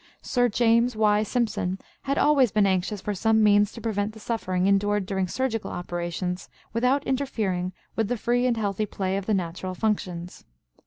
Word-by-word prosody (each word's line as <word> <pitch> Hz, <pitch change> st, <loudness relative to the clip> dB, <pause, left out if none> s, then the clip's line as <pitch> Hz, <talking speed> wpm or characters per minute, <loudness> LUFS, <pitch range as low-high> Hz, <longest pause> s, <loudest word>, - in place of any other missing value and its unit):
Sir 245 Hz, -1 st, +2 dB
James 235 Hz, +2 st, +3 dB
Y. 210 Hz, -1 st, +3 dB
Simpson 215 Hz, -4 st, -1 dB, 0.2 s
had 275 Hz, 0 st, -1 dB
always 275 Hz, -6 st, +4 dB
been 210 Hz, -1 st, +3 dB
anxious 195 Hz, +2 st, 0 dB
for 210 Hz, -, -2 dB
some 220 Hz, +2 st, +3 dB
means 205 Hz, -1 st, +5 dB
to 230 Hz, -, -10 dB
prevent 215 Hz, -2 st, -1 dB
the 220 Hz, -, -12 dB
suffering 185 Hz, -5 st, -1 dB
endured 200 Hz, 0 st, +2 dB
during 190 Hz, -1 st, -1 dB
surgical 225 Hz, -1 st, -2 dB
operations 175 Hz, +1 st, -4 dB, 0.2 s
"without 250 Hz, +5 st, +2 dB
interfering 215 Hz, -10 st, -1 dB, 0.2 s
with 225 Hz, -2 st, +1 dB
the 245 Hz, +2 st, -1 dB
free 245 Hz, +3 st, +1 dB
and 240 Hz, -2 st, +1 dB
healthy 210 Hz, 0 st, -1 dB
play 190 Hz, -1 st, -2 dB
of 195 Hz, -1 st, -3 dB
the 215 Hz, -, +2 dB
natural 185 Hz, +1 st, -3 dB
functions." 180 Hz, -5 st, -2 dB
210 Hz, 170 wpm, -25 LUFS, 190-230 Hz, 0.2 s, means